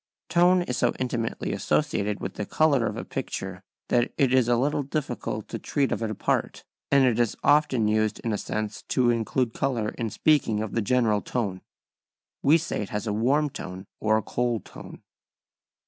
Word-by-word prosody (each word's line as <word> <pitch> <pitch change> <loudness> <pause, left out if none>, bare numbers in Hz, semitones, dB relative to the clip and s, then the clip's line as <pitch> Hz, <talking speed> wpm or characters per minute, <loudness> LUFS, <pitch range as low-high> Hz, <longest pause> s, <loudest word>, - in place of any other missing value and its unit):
Tone 175 +1 +4
is 125 -7 -3
so - - +2
intimately 120 -3 -2
associated 100 0 0
with - - -4
the 105 - -5
colour 140 -7 +3
of - - -4
a - - -5
picture 95 -1 -5 0.3
that 120 -1 +2
it 130 -2 +3
is 130 -3 +4
a 120 - +4
little 145 +4 +1
difficult 140 +1 -3
to - - -4
treat 140 -2 0
of - - -1
it 110 - -1
apart, 110 - -1 0.3
and 140 -1 +5
it 120 -2 +2
is 120 -3 +1
often 140 -7 +3
used 110 0 +1
in 115 - -1
a - - 0
sense 110 0 -4
to 125 -2 +3
include 115 +1 0
colour 115 -5 -1
in 115 -1 -4
speaking 125 -4 +2
of 110 - -5
the 115 - 0
general 110 -2 +2
tone. 100 -7 -3 0.8
We 150 +4 +5
say 165 - -3
it 105 - -5
has 105 +1 -3
a 105 - -1
warm 135 +7 +2
tone 95 -3 -7
or 110 0 +3
a 110 - -2
cold 120 0 -1
tone. - - -11
120 Hz, 190 wpm, -26 LUFS, 110-135 Hz, 0.8 s, and